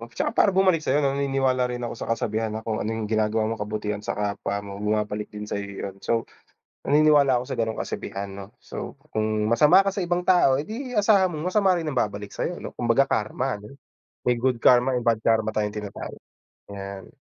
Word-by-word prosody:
Tsaka - - 0
para 205 - +6
bumalik 185 -4 +4
sa'yo 145 +1 +2
'no? 135 0 +1
Naniniwala 135 -2 +1
rin 120 0 -4
ako 120 - -3
sa - - -6
kasabihan 110 -1 -1
na, 110 - -5
kung 110 -1 -1
ano 105 - -2
yung 110 -1 -4
ginagawa 110 0 +1
mo 115 - -2
kabutihan 105 0 -3
sa - - -3
kapwa 100 0 -2
mo, 100 -1 -8
bumabalik 105 0 -1
din 105 0 -7
sa'yo 100 -1 -3 0.2
yun. 95 -1 -5
So, 115 -1 0 0.6
naniniwala 145 -2 +5
ako 125 - -4
sa - - -2
gano'ng 110 -1 -1
kasabihan 100 0 -5
'no. 100 +1 -10
So, - - -7 0.2
kung 110 0 0
masama 150 +11 +6
ka 195 - 0
sa 195 -1 -2
ibang 175 +1 0
tao, 175 -7 +4
edi 245 - -5
asahan 200 -3 +4
mong 155 +4 -2
masama 195 -2 +3
rin 165 -3 -3
ang 135 - -4
babalik 105 -2 -2
sa'yo, - - -3
'no? - - -6
Kumbaga 120 +3 +3
karma 110 +3 -1
ano, 105 +6 -12 0.5
may 125 - +4
good 125 -2 +1
karma, 125 +1 +5
may 120 - -6
bad 115 -2 +2
karma 110 -1 +2
tayong 105 -1 -1
tinatawag. 105 -1 -6 0.6
'Yan. 100 -1 -8
115 Hz, 205 wpm, -25 LUFS, 105-145 Hz, 0.6 s, para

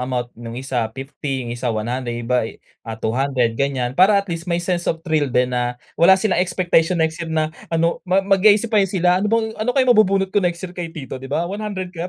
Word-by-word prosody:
amount 125 -2 -2
nung 115 0 -7
isa 125 -3 -2
50, 135 -1 -4
yung 120 - -5
isa 120 +1 -3
100, 120 +2 -2
yung 120 - -5
iba, 120 -3 +2 0.3
ah, 115 -1 -7
200, 125 +1 0
gan'yan, 130 -3 0
para 190 +7 +5
at 200 - +1
least 170 -1 -6
may 170 - +1
sense 175 0 -2
of 165 +1 -2
thrill 155 -4 +1
din 125 0 +1
na 125 0 -1 0.2
wala 190 +3 +7
silang 190 -2 +1
expectation 175 -1 +1
next 160 0 0
year 165 - -4
na 155 -1 -1 0.2
ano 165 0 0
mag-isip 200 +4 +3
pa 215 - +5
sila, 180 0 +2
"Ano 210 - 0
bang 225 0 +1
ano 225 - -2
kaya 260 - +5
mabubunot 195 -5 +3
ko 205 - +3
next 175 -1 -2
year 180 - -7
kay 175 -2 -5
tito," 140 -6 -8
'di 135 - -9
ba? 160 +4 0
"100 190 -1 -5
ba 170 +1 -5
165 Hz, 225 wpm, -20 LUFS, 130-185 Hz, 0.3 s, wala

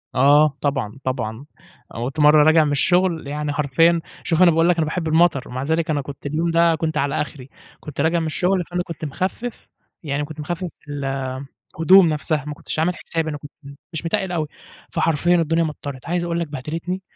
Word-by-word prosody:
آه 145 +2 +5
،طبعًا، 135 -5 -2
طبعًا، 130 0 -3 0.6
كنت 135 +4 -5
مرّة 150 0 +7
راجع 160 +1 +5
من 145 - 0
الشغل 175 +1 +2
يعني 150 0 -3
حرفيًا 165 +4 +3 0.2
شوف 165 +1 +1
أنا 175 - +7
باقول 165 +2 +3
لك 180 - +4
أنا 160 - +2
باحب 165 +1 -3
المطر 160 -4 +2
ومع 130 +2 -4
ذلك 160 +2 0
أنا 145 -2 +1
كنت 140 +1 -10
اليوم 160 +4 0
ده 165 -1 +3 0.2
على 140 +1 0
آخري 140 -3 -7 0.3
كنت 145 -2 -5
راجع 165 +2 +2
من 160 - -2
الشغل 180 +3 +1
فأنا 175 +1 -3
كنت 165 -2 -7
مخفف، 195 - -4 0.4
يعني 145 0 -2
كنت 155 +1 -10
مخفف 175 +4 -4 0.2
ال 145 -1 -4 0.7
الهدوم 175 +2 +6
نفسها 150 -1 -1
ماكنتش 150 +1 -5
عامل 175 +2 +1
حسابي 165 -1 -3
أنا 145 - -4
كنت 145 0 -12 0.4
مش 160 +1 -5
متقل 190 +1 -1
أوي، 160 -3 -1 0.4
فحرفيًا 165 +2 +2
الدنيا 165 0 +2
مطرت، 145 -4 -6
عايز 175 +1 0
أقول 170 0 -1
لك 170 - -2
بهدلتني 165 +6 -4
155 Hz, 185 wpm, -21 LUFS, 145-170 Hz, 0.7 s, مرّة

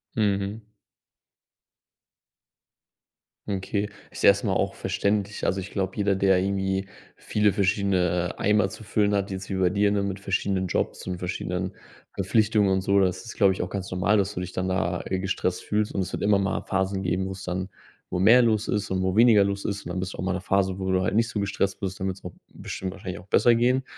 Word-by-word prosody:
Mhm. 100 0 -1 2.8
Okay. 100 +1 -2 0.2
Ist - - -8
erstmal - - +4
auch - - 0
verständlich. 100 0 -1
Also, 95 - +1
ich 95 +1 -6
glaube, 95 -2 -2
jeder, 100 -1 +2
der 95 -1 +3
irgendwie 95 0 -1 0.3
viele 105 -2 +1
verschiedene, 90 -3 +1
äh, - - -9
Eimer 105 -1 +3
zu 100 - -10
füllen 105 0 +1
hat, 100 0 0
jetzt 95 0 -6
wie - - -1
bei 95 -1 +2
dir, 100 +2 +2
ne, 100 -1 +1
mit 100 -1 -3
verschiedenen 95 -1 -1
Jobs 90 - -2
und 90 -1 -4
verschiedenen 90 +1 -3 0.4
Verpflichtungen 105 +1 +2
und 95 0 +2
so. 100 +1 +3
Das 95 -2 +1
ist, 115 - -9
glaube 100 -3 +5
ich, - - -4
auch 90 - -3
ganz 95 -1 -5
normal, 95 +3 +2
dass 100 0 0
du - - -4
dich 90 0 -5
dann 95 +1 -2
da, 90 -1 -1
äh, 95 - -2
gestresst 95 -1 -2
fühlst 105 0 -1
und 100 - 0
es 90 - -4
wird - - -4
immer 100 -1 +4
mal 100 +1 -1
Phasen 95 0 -1
geben, 90 +1 -1
wo 95 - -4
es 95 0 -9
dann 95 +1 -3 0.4
wo 90 - -1
mehr 115 +6 +7
los 110 -2 +1
ist 105 -2 -1
und 95 0 0
wo 95 0 0
weniger 110 -2 +6
los 100 0 -2
ist. 100 -1 -3
Und - - -6
dann 90 +1 -3
bist 95 +1 -4
du - - -10
auch - - -2
mal 95 - 0
in 95 - -1
'ner - - -7
Phase, 95 -1 +1
wo 95 -1 -2
du 95 0 +2
halt 95 +2 0
nicht 115 +1 +3
so 110 - -3
gestresst 100 -1 -1
bist, 95 -2 -4
dann 95 - -2
wird's 95 0 -5
auch 90 - -7 0.2
bestimmt 95 -1 -6
wahrscheinlich 90 -2 -7
auch 90 - -14
besser 120 +3 +4
gehen. 125 +3 +2
95 Hz, 225 wpm, -25 LUFS, 95-100 Hz, 2.8 s, mehr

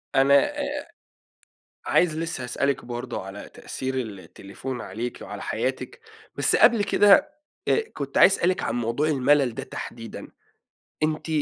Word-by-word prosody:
أنا 135 +1 +5 0.3
آآ 285 +1 -3 1.0
عايز 160 -3 +2
لسه 165 -5 -3
هأسألِك 135 +2 -1
برضه 120 0 -5
على 95 +1 -9
تأثير 130 0 -5
التليفون 110 +2 -6
عليِكِ 115 +6 -5
وعلى - - -7
حياتِك 480 - -3 0.4
بس - - +3
قبل 215 -4 +5
كده 205 +10 +5 0.4
آآ - - +4
كنت 140 -1 -3
عايز 195 - +7
أسألِك 180 +2 +1
عن 115 - -2
موضوع 120 +6 0
المَلل 140 -3 +3
ده - - -5
تحديدًا 115 -2 -8 0.8
أنتِ 155 +1 -1
135 Hz, 130 wpm, -25 LUFS, 120-165 Hz, 1.0 s, عايز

